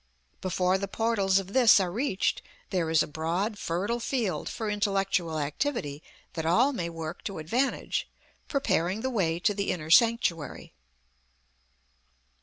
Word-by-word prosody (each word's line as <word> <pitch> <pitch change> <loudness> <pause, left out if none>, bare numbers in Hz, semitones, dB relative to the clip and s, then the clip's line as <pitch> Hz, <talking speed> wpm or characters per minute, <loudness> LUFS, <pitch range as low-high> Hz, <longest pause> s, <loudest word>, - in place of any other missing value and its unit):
Before 185 0 +1
the 200 - -3
portals 200 -3 +1
of 195 0 -3
this 240 -5 +7
are 185 -2 -1
reached 225 -1 0 0.3
there 175 -4 0
is 160 -1 +4
a - - -6
broad, 175 +8 -2
fertile 200 +8 -1
field 230 - -2
for 220 - -4
intellectual 195 -5 0
activity 150 - -2 0.3
that 160 - -3
all 235 - +3
may 170 -8 -3
work 165 0 -6
to 195 - -4
advantage, 235 - -1 0.4
preparing 195 - 0
the 260 - -1
way 170 -8 +1
to 205 +4 +1
the 200 0 -2
inner 155 -2 -3
sanctuary. 205 - +2
190 Hz, 140 wpm, -28 LUFS, 165-225 Hz, 0.4 s, this